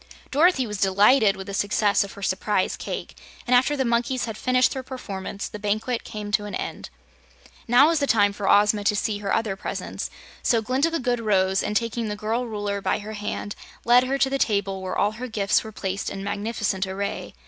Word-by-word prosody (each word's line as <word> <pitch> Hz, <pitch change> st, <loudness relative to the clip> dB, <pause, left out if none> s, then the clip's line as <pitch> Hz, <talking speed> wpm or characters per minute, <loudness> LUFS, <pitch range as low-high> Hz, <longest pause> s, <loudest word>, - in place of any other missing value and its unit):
Dorothy 300 Hz, -2 st, +4 dB
was 210 Hz, -3 st, -5 dB
delighted 205 Hz, +3 st, +5 dB
with 190 Hz, -, -7 dB
the 200 Hz, -, -7 dB
success 205 Hz, +1 st, +2 dB
of 200 Hz, -, -9 dB
her 200 Hz, -, -10 dB
"Surprise 190 Hz, +1 st, 0 dB
Cake," -, -, -6 dB, 0.3 s
and 250 Hz, -, +3 dB
after 265 Hz, +4 st, +3 dB
the 265 Hz, -, +1 dB
monkeys 240 Hz, +2 st, 0 dB
had 225 Hz, -2 st, -5 dB
finished 255 Hz, +2 st, +2 dB
their 265 Hz, -, -4 dB
performance, 205 Hz, -6 st, -6 dB
the 210 Hz, -, -8 dB
banquet 215 Hz, +4 st, -1 dB
came 210 Hz, -1 st, -6 dB
to 210 Hz, 0 st, +1 dB
an 205 Hz, -2 st, -5 dB
end. -, -, -5 dB, 0.8 s
Now 250 Hz, +6 st, +6 dB
was 330 Hz, -2 st, +2 dB
the 280 Hz, -, 0 dB
time 205 Hz, -4 st, +3 dB
for 200 Hz, -1 st, -2 dB
Ozma 205 Hz, 0 st, +4 dB
to 210 Hz, -, +3 dB
see 205 Hz, 0 st, -1 dB
her 200 Hz, -1 st, -3 dB
other 220 Hz, -4 st, 0 dB
presents, -, -, -5 dB, 0.3 s
so 230 Hz, -, +3 dB
Glinda 260 Hz, +8 st, +1 dB
the 330 Hz, 0 st, -2 dB
Good 245 Hz, -2 st, 0 dB
rose 190 Hz, -3 st, +2 dB
and, 210 Hz, -, 0 dB
taking 230 Hz, -1 st, -2 dB
the 210 Hz, -, -3 dB
girl 225 Hz, +4 st, -2 dB
Ruler 205 Hz, -2 st, -3 dB
by -, -, +1 dB
her 215 Hz, +1 st, -7 dB
hand, 210 Hz, -1 st, -4 dB, 0.3 s
led 245 Hz, +2 st, +6 dB
her 270 Hz, +2 st, 0 dB
to 270 Hz, -, +2 dB
the 275 Hz, -, 0 dB
table 200 Hz, -4 st, 0 dB
where 185 Hz, -, -4 dB
all 205 Hz, -, +2 dB
her 240 Hz, +4 st, -6 dB
gifts 210 Hz, -4 st, +1 dB
were 220 Hz, -, -8 dB
placed 195 Hz, -1 st, -3 dB
in 195 Hz, -, -6 dB
magnificent 205 Hz, -1 st, -2 dB
array. 200 Hz, +1 st, -4 dB
210 Hz, 215 wpm, -24 LUFS, 200-245 Hz, 0.8 s, Now